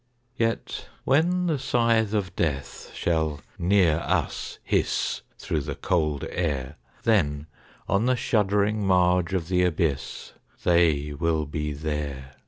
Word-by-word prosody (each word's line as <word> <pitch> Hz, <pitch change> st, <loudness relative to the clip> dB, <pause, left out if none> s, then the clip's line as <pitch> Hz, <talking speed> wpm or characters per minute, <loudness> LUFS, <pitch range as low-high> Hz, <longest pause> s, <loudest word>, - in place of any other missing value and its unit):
Yet 115 Hz, -1 st, -2 dB
when 175 Hz, +6 st, +2 dB
the 160 Hz, -5 st, 0 dB
scythe 115 Hz, -4 st, +2 dB
of 95 Hz, -4 st, -2 dB
Death 70 Hz, -5 st, -3 dB
shall 80 Hz, -3 st, 0 dB, 0.2 s
near 90 Hz, -3 st, +4 dB
us -, -, -2 dB
hiss -, -, 0 dB, 0.2 s
Through 75 Hz, -, -2 dB
the -, -, -5 dB
cold 75 Hz, -5 st, 0 dB
air, 75 Hz, -5 st, -2 dB, 0.3 s
Then 75 Hz, -10 st, +2 dB, 0.4 s
on 100 Hz, +5 st, +2 dB
the 130 Hz, -, +3 dB
shuddering 105 Hz, -2 st, +1 dB
marge 90 Hz, -1 st, +3 dB
of 85 Hz, -3 st, -1 dB
the 90 Hz, 0 st, +2 dB
abyss 80 Hz, -5 st, -1 dB, 0.3 s
They 80 Hz, -4 st, +3 dB
will 80 Hz, +1 st, 0 dB
be 75 Hz, +1 st, -3 dB
there. 70 Hz, -3 st, -4 dB
85 Hz, 125 wpm, -26 LUFS, 75-105 Hz, 0.4 s, near